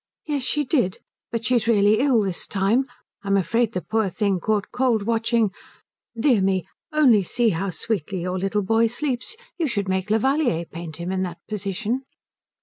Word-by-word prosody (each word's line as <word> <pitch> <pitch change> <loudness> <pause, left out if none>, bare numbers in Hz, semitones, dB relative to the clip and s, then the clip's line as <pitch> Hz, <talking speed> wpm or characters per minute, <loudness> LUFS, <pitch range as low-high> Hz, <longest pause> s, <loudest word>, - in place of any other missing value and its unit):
"Yes, 290 -2 -1
she 295 +3 +1
did. 245 - +1 0.3
But 230 -1 -3
she's 235 -1 +2
really 210 -1 +4
ill 260 -4 +3
this 190 -3 -3
time. 205 +7 +2 0.4
I'm 200 0 +2
afraid 225 +6 +1
the 180 - -2
poor 220 -3 0
thing 195 0 0
caught 210 +2 -1
cold 245 -5 +1
watching 225 -1 +1 0.7
dear 245 -4 +4
me, 190 -1 +1 0.3
only 270 -9 +5
see 235 +5 +1
how 195 +1 -1
sweetly 190 -1 -3
your 185 +1 -2
little 195 +2 0
boy 225 +3 +3
sleeps. 255 - -3 0.2
You 325 - +1
should 205 -6 -2
make 190 +1 -1
Levallier 230 - +2
paint 165 -2 -8
him 170 +2 -4
in 190 0 -1
that 175 -2 -3
position." 210 +4 -2
215 Hz, 170 wpm, -23 LUFS, 190-240 Hz, 0.7 s, only